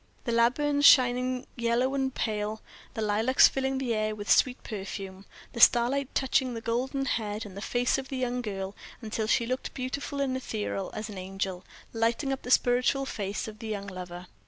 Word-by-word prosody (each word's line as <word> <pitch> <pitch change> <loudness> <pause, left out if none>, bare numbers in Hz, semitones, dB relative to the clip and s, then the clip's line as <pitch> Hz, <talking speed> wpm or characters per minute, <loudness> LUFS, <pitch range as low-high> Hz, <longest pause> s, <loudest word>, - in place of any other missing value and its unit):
The 235 - -2
laburnums 285 +5 +2
shining 250 -1 +5
yellow 235 +2 +1
and 265 -1 0
pale; 215 -3 -3 0.3
the 220 - -2
lilacs 220 +5 +5
filling 265 0 -1
the 255 -3 -1
air 215 0 -1
with 205 -1 -3
sweet 255 0 +3
perfume; 195 -2 -6 0.3
the 235 - -6
starlight 250 +4 +4
touching 260 -2 +1
the - - -3
golden 255 +4 -1
head 215 -4 -2
and 200 0 -8
face 245 +2 +1
of 265 - -7
the 270 - -4
young 250 -1 -1
girl 195 -3 -5 0.3
until 220 0 -2
she 235 - +2
looked 255 +2 -4
beautiful 280 +2 -4
and 270 -2 0
ethereal 210 -6 -3
as 215 0 -5
an 195 - -7
angel 190 -1 -4 0.3
lighting 230 +5 0
up 265 - -5
the - - -8
spiritual 250 +2 +3
face 200 -5 -4
of 215 0 -9
the 225 - -7
young 205 -2 -4
lover. 180 -2 -8
235 Hz, 180 wpm, -28 LUFS, 210-260 Hz, 0.3 s, shining